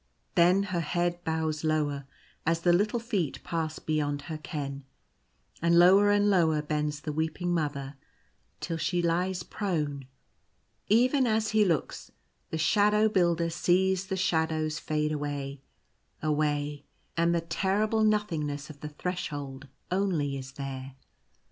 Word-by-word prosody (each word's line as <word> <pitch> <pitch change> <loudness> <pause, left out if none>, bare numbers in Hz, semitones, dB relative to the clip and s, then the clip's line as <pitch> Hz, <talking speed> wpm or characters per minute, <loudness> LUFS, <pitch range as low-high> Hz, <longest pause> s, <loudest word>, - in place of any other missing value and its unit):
Then 180 +2 +5
her 185 -3 -2
head 175 +2 -1
bows 160 -1 -1
lower 145 -3 0 0.4
as 165 +1 +1
the 175 0 +4
little 210 +6 +2
feet 210 - -2
pass 160 -2 -2
beyond 145 -2 -1
her 155 -1 -6
ken; 140 -3 -5 0.8
and 170 +1 +4
lower 190 +4 +7
and 205 0 +4
lower 160 -6 +3
bends 150 0 -2
the 150 - -3
weeping 160 +3 -1
Mother 145 -4 -2 0.6
till 165 - -3
she 175 +2 0
lies 175 +2 0
prone. 150 -11 -3 0.8
Even 255 +5 +4
as 220 -1 +1
he 220 -1 +4
looks, 170 -7 -1 0.4
the 160 - -3
Shadow 210 +6 +3
Builder 170 -4 +2
sees 185 +2 +2
the 190 - -2
shadows 160 -4 0
fade 150 0 -1
away, 145 -2 -4 0.6
away, 150 -1 0 0.3
and 170 0 +2
the 170 - +1
terrible 200 +6 +1
nothing 210 -8 +1
ness 145 +1 -5
of 145 - -15
the 150 - -6
Threshold 145 -5 -5 0.2
only 175 -7 0
is 135 0 -7
there. 135 -1 -6
165 Hz, 135 wpm, -28 LUFS, 150-185 Hz, 0.8 s, lower